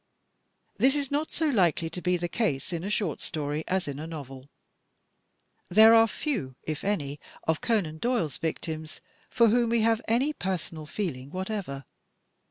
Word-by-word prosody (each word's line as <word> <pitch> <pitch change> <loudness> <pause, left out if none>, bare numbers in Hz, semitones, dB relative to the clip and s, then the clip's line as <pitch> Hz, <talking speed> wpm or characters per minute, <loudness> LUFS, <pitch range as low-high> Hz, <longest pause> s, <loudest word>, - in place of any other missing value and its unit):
Tins 270 +2 +5
is 280 -2 -1
not 295 +2 0
so 320 - 0
likely 180 - +2
to 180 - -6
be 180 0 +2
the 175 0 -2
case 175 - -1
in 170 0 -3
a 200 - -3
short 205 -7 -1
story 150 0 -2
as 190 -2 0
in 140 0 -4
a 155 - -5
novel. 135 -4 -8 1.2
There 220 +4 +8
are 225 0 +7
few, 210 - -3
if 155 -2 -4
any, 150 -8 -1 0.3
of 160 -1 +1
Conan 175 -9 0
Doyle's 235 - 0
victims 160 -1 -4 0.3
for 235 -2 +4
whom 235 +1 +3
we 230 -1 +2
have 225 +1 +3
any 255 +7 +2
personal 175 - -4
feeling 145 -9 -4
whatever. 185 - -4
180 Hz, 165 wpm, -28 LUFS, 155-225 Hz, 1.2 s, There